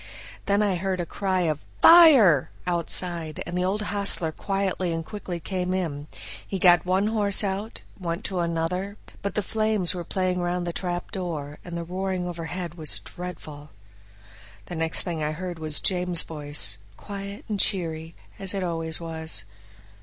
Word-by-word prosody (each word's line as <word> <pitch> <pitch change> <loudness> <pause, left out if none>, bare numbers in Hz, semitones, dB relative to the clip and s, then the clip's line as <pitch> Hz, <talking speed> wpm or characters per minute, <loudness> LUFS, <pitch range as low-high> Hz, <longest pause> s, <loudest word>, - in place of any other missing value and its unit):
Then 200 +1 +3
I 195 -3 +1
heard 190 +1 -2
a 175 - -1
cry 190 +1 -1
of 155 -4 0 0.2
"Fire!" 275 - +8 0.2
outside, 170 -2 -2
and 175 - -5
the 180 - 0
old 200 +3 -1
hostler 200 -5 +3
quietly 195 0 -2
and 165 -1 -3
quickly 185 -3 -6
came 185 +1 -2
in; 150 -6 -3 0.4
he 195 - -3
got 175 -1 +5
one 190 +2 +2
horse 210 -2 +4
out, 200 +3 -4
and 185 - -13
went 170 +4 -2
to 190 -5 -3
another, 175 +4 -2 0.2
but 200 - -4
the 210 - 0
flames 215 -3 +1
were 175 -1 -5
playing 185 +1 -1
round 175 0 -1
the 170 - -3
trapdoor, 175 -5 -4
and 175 -1 -6
the 170 - -3
roaring 185 +1 -3
overhead 175 0 -5
was 160 -3 -3
dreadful. 155 -4 -8 1.0
The 175 - -7
next 160 0 +2
thing 170 -4 -4
I 150 +1 -1
heard 175 +1 -6
was 155 -2 -2
James' 180 -2 +5
voice, 145 -10 0 0.2
quiet 200 0 -8
and 210 -2 -3
cheery, 165 -4 +1 0.2
as 195 0 +3
it 195 - -2
always 165 -2 -1
was. 160 -9 -2
180 Hz, 165 wpm, -25 LUFS, 165-195 Hz, 1.0 s, Fire